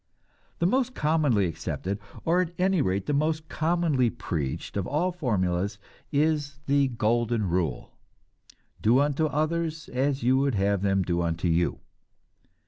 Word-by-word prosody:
The 170 - 0
most 255 +5 +1
commonly 150 -10 +2
accepted, 95 +3 -3 0.3
or 175 +2 +3
at 175 -1 -3
any 185 -2 +2
rate 95 -3 0
the 150 - -1
most 155 +2 0
commonly 155 -6 +1
preached, 80 - -4
of 100 -2 -1
all 170 +5 0
formulas 100 - -1 0.3
is 145 -1 +1
the 140 -1 +3
"golden 115 -2 0
rule," 85 -7 -1 0.9
"Do 115 +4 +4
unto 145 +2 +2
others 155 +2 -2
as 135 0 0
you 130 +2 +4
would 135 -3 +1
have 100 0 +1
them 95 -1 +2
do 85 -1 0
unto 85 +1 -1
you." 85 +1 +1
130 Hz, 140 wpm, -27 LUFS, 100-155 Hz, 0.9 s, Do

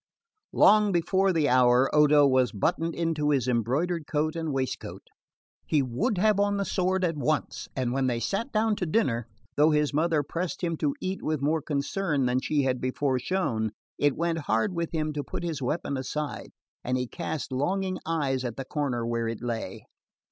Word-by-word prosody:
Long 210 -1 +5
before 190 +2 +2
the 160 -4 +2
hour 125 0 +5
Odo 150 -1 +6
was 130 -2 +3
buttoned 165 +11 -1
into 160 -3 0
his 135 -4 +1
embroidered 140 - 0
coat 155 +1 -1
and 165 -2 -2
waistcoat. 130 -1 -4 0.6
He 150 -3 +2
would 190 - -1
have 210 +1 +3
on 205 0 +2
the 200 - -1
sword 185 0 0
at 165 -2 -1
once, 150 +1 -1
and 125 -2 -1
when 135 0 +1
they 120 -2 0
sat 215 - -2
down 215 0 +2
to 180 - -2
dinner, 125 - 0 0.3
though 150 +2 +5
his 150 -1 +1
mother 155 0 +2
pressed 170 +5 -4
him 170 -1 0
to 145 -2 0
eat 185 +1 -3
with 155 -3 -2
more 155 +2 +1
concern 145 +1 -1
than 125 +1 +2
she 145 0 +1
had 130 -1 0
before 130 +1 0
shown, 115 - -1 0.3
it 145 -2 +2
went 170 0 0
hard 110 - +2
with 170 -1 -2
him 155 -2 -1
to 145 -1 -3
put - - -6
his 165 -5 -3
weapon 140 +1 -2
aside, 145 +3 -4 0.3
and 125 +1 0
he 125 - -1
cast 140 +4 -5
longing 185 +8 -1
eyes 140 -6 -1
at 120 -3 -4
the 135 - -5
corner 130 -5 -2
where 115 -1 -1
it 115 +1 -5
lay. 115 -2 -4
150 Hz, 190 wpm, -27 LUFS, 130-170 Hz, 0.6 s, Odo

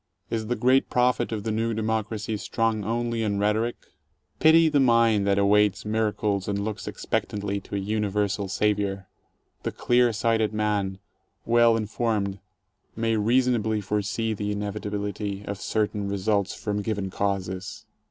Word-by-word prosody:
Is 110 -1 -2
the 120 - 0
great 130 +4 +3
prophet 125 -2 +2
of 105 -2 -3
the 110 - -2
New 115 +1 0
Democracy 110 0 -2
strong 110 0 -1
only 115 +2 -1
in 105 -2 0
rhetoric? 105 +4 +1 0.6
Pity 160 +1 +6
the 150 -2 +3
mind 115 -5 +4
that 100 0 +3
awaits 100 0 +3
miracles 105 -2 0
and 100 -1 -1
looks 110 -1 -5
expectantly 100 -1 -2
to 100 - -8
a - - 0
universal 105 0 -1
Savior. 100 -1 0 0.6
The - - -3
clear 120 0 +3
sighted 110 -1 +1
man, 105 -3 0 0.5
well 115 0 +4
informed, 105 -3 -1 0.6
may 115 0 0
rea 115 +5 +3
sonably 110 -4 0
foresee 105 +3 -1
the 105 0 -3
inevitability 105 -1 -4
of 100 -1 -5
certain 105 -2 -1
results 100 0 0
from 105 -1 -2
given 100 -3 -3
causes. 95 -1 -3
105 Hz, 140 wpm, -25 LUFS, 100-115 Hz, 0.6 s, Pity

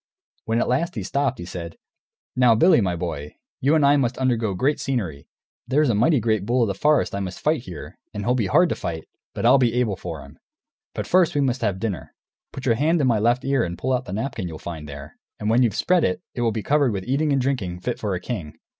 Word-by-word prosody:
When 115 +1 0
at - - 0
last 135 +6 0
he 105 - -3
stopped 135 +4 -1
he 85 - -7
said, 85 -2 -7 0.6
"Now, 125 -3 +5
Billy, 120 +1 +5
my 90 -3 0
boy, 80 -4 -5 0.2
you 140 +4 +3
and 150 -3 +4
I 145 +1 +5
must 125 -2 0
undergo 120 -6 0
great 140 +9 +1
scenery; 95 - -3 0.4
there's 140 +1 +3
a - - +1
mighty 125 +8 +3
great 110 -3 0
bull 120 +4 +2
of - - +1
the - - 0
forest 150 +8 +2
I 100 - -2
must 95 -2 -5
fight, 155 -3 +1
here, 90 -4 -9
and 105 - -5
he'll 125 - +3
be 115 -6 0
hard 170 - +4
to - - -1
fight, 80 -3 -5 0.3
but - - -2
I'll 135 - +6
be 120 -2 +2
able 120 -5 +1
for 85 -6 -7
him. - - -16 0.6
But - - -3
first 180 -4 +3
we 145 - +2
must 130 -2 0
have 100 -4 0
dinner. 100 -5 -4 0.4
Put 135 - -8
your 120 - +4
hand 155 +8 +2
in 145 - +2
my 115 -4 +3
left 120 +4 +1
ear 135 -3 +2
and 85 0 -4
pull 130 +8 -1
out 125 0 -1
the 90 - -6
napkin 110 -3 -3
you'll 80 -2 -7
find 80 -3 -7
there, 70 +1 -10 0.2
and 105 +1 0
when 120 +3 +4
you've 115 -5 +2
spread 180 +5 +2
it, 90 - -1
it 120 - -4
will 115 -1 +2
be 110 -1 -4
covered 145 -5 +2
with 95 -2 -4
eating 145 +4 +1
and 140 - +2
drinking 105 -10 -2
fit 125 - -3
for 100 -3 -2
a - - -3
king." 90 -7 -6
115 Hz, 255 wpm, -23 LUFS, 95-135 Hz, 0.6 s, I'll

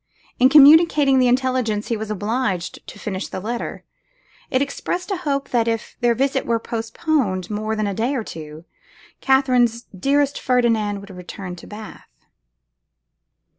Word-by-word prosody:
In 255 - +6
communicating 295 -1 +6
the 255 - +4
intelligence, 250 -4 0
he 230 - +1
was 220 0 -5
obliged 210 -3 -2
to - - -10
finish 195 -2 -4
the 190 - -6
letter; 235 +5 -5 0.7
it 255 - +1
expressed 355 +7 -3
a 390 - 0
hope 275 -5 -2
that, 235 -2 +1
if 225 -1 -3
their 240 -1 +3
visit 270 +2 0
were 230 - +2
postponed 225 - -2
for 210 - -7
more 215 +1 -2
than 215 -1 -1
a 200 - -2
day 235 +8 -1
or 240 - -2
two, 155 -3 -9 0.5
Katherine's 250 -3 +2
dearest 280 +7 +1
Ferdinand 225 -5 +1
would 200 0 -12
return 180 0 -8
to - - -12
Bath. 215 0 -11
235 Hz, 155 wpm, -21 LUFS, 210-265 Hz, 0.7 s, In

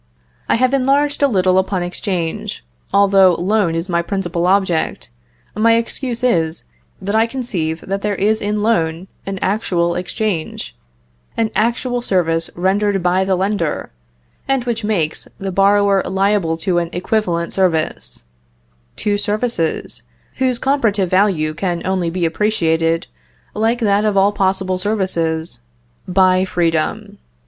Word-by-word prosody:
I - - +4
have 255 +3 +2
enlarged 280 +2 +2
a 285 - +5
little 185 -5 +3
upon 190 -1 -1
exchange, 175 - -3 0.3
although 195 -2 +5
loan 185 -1 +1
is 165 +2 -2
my 170 -2 +1
principal 175 -2 -2
object: 185 - 0 0.4
my 230 +2 +3
excuse 235 +1 -3
is, 165 -9 +1 0.3
that 195 +2 -3
I 220 +1 +3
conceive 185 -11 -3
that 195 +1 -3
there 210 0 -1
is 215 +3 +1
in 210 +1 -1
a - - -1
loan 180 -5 0 0.2
an 195 0 -3
actual 180 -4 0
exchange, 180 -1 -3 0.6
an 225 -1 0
actual 240 +2 0
service 165 -6 0
rendered 195 +1 +1
by 180 +1 +2
the 190 0 +1
lender, 190 -4 -1 0.6
and 270 -2 +1
which 235 -2 -3
makes 180 -8 -1
the 195 -1 -4
borrower 200 +1 +3
liable 190 -4 0
to 180 -3 +2
an 170 -1 -3
equivalent 175 -2 -1
service, 170 - -1 0.7
two 205 -1 -1
services, 210 -5 -1 0.4
whose 255 -2 +1
comparative 225 -9 +1
value 185 -5 +2
can 175 0 -3
only 185 -2 0
be 175 0 -1
appreciated, 165 -3 +1 0.5
like 225 +3 +1
that 205 -3 +2
of 210 -2 +1
all 195 +1 +4
possible 190 -2 0
services, 170 -6 -1 0.5
by 185 0 +3
freedom. 165 -4 -1
195 Hz, 135 wpm, -18 LUFS, 175-215 Hz, 0.7 s, a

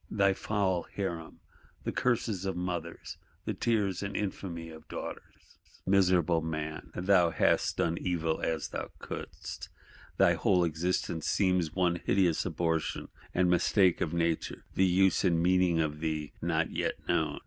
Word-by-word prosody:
Thy 100 -2 +3
foul 95 -3 -1
Harem; 85 -5 -4 0.4
the - - -2
curses 115 -6 0
of 95 -1 -2
mothers, 85 -2 -4 0.3
the - - -1
tears 105 -6 0
and 100 0 -3
infamy 85 -5 -4
of 80 -1 -13
daughters? - - -9 0.3
Miserable 90 -4 +3
man! 80 -1 -4
thou 90 -2 +4
"hast - - +2
done 85 0 0
evil 80 -3 -1
as 80 -2 -1
thou - - -5
couldst:" - - -7 0.5
thy - - +5
whole 90 -3 +3
existence 85 0 -1
seems 90 -5 +1
one 90 -2 +2
hideous 90 -3 +2
abortion 80 -2 -1 0.3
and 90 0 +3
mistake 90 +1 +3
of 80 - 0
Nature; 85 -1 -1
the 95 - +3
use 95 0 +3
and 85 -4 +3
meaning 90 -1 +3
of 75 -1 -1
thee 75 -2 -3
not - - 0
yet - - -1
known. - - 0
90 Hz, 145 wpm, -30 LUFS, 80-95 Hz, 0.5 s, thy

